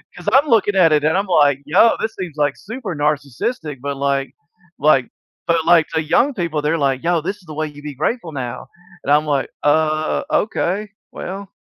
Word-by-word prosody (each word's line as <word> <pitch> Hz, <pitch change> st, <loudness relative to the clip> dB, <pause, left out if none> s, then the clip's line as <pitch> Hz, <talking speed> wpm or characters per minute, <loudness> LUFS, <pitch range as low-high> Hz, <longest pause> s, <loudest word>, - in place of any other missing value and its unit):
'Cause 180 Hz, +3 st, -3 dB
I'm 275 Hz, +4 st, +5 dB
looking 220 Hz, -5 st, +3 dB
at 165 Hz, -4 st, +5 dB
it, 150 Hz, -1 st, +2 dB
and 160 Hz, +4 st, +2 dB
I'm 200 Hz, 0 st, -1 dB
like, 145 Hz, -6 st, +3 dB
"Yo, 190 Hz, +10 st, +4 dB
this 220 Hz, 0 st, -3 dB
seems, 175 Hz, -5 st, -6 dB
like, 145 Hz, -2 st, +1 dB
super 215 Hz, -, -6 dB
narcissistic," 145 Hz, -, -2 dB
but, 140 Hz, 0 st, -4 dB
like 140 Hz, 0 st, -1 dB, 0.5 s
like 135 Hz, -4 st, +4 dB, 0.4 s
but, 170 Hz, -1 st, +2 dB
like, 165 Hz, -2 st, +5 dB
the 160 Hz, -, +1 dB
young 240 Hz, -, +2 dB
people, 170 Hz, -7 st, -2 dB
they're 150 Hz, +3 st, 0 dB
like, 135 Hz, -2 st, 0 dB
"Yo, 170 Hz, -1 st, +1 dB
this 195 Hz, +5 st, -4 dB
is 200 Hz, -, -22 dB
the 155 Hz, -, -9 dB
way 155 Hz, +1 st, -2 dB
you'd 145 Hz, 0 st, -12 dB
be 150 Hz, -1 st, -6 dB
grateful 165 Hz, -, -2 dB
now!" 125 Hz, -4 st, -5 dB, 0.4 s
And 145 Hz, -, -1 dB
I'm 150 Hz, +1 st, +4 dB
like, 145 Hz, -3 st, 0 dB
"Uh, 155 Hz, +1 st, +1 dB
okay, 210 Hz, -1 st, 0 dB, 0.2 s
well" 195 Hz, 0 st, -7 dB
155 Hz, 200 wpm, -19 LUFS, 145-190 Hz, 0.5 s, I'm